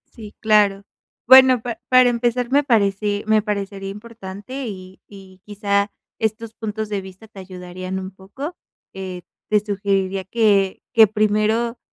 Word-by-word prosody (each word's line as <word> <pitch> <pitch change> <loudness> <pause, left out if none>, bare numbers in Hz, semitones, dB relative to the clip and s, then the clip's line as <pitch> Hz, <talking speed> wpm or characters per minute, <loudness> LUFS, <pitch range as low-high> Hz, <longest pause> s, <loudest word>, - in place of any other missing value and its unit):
Sí, 215 -3 -11
claro. 205 -2 +3 0.4
Bueno, 260 0 +8
pa 240 -2 -5
para 255 -1 +6
empezar 240 +1 -1
me 285 +2 +4
parece 205 -4 +1
me 215 0 +3
parecería 200 -2 -4
importante 220 +4 -8
y 185 -2 -9
y 190 -2 -15
quizá, 200 -1 -1 0.3
estos 220 +1 -2
puntos 220 -1 -5
de 205 -2 -2
vista 190 +3 -13
te 205 -2 -13
ayudarían 185 0 -7
un 190 0 -7
poco. 200 - -8 0.4
Eh, 185 -2 -7 0.3
te 210 -1 +4
sugeriría 195 -2 -1
que 200 -2 +1
que 220 -1 +7
primero, 215 +3 0
210 Hz, 140 wpm, -21 LUFS, 195-225 Hz, 0.4 s, Bueno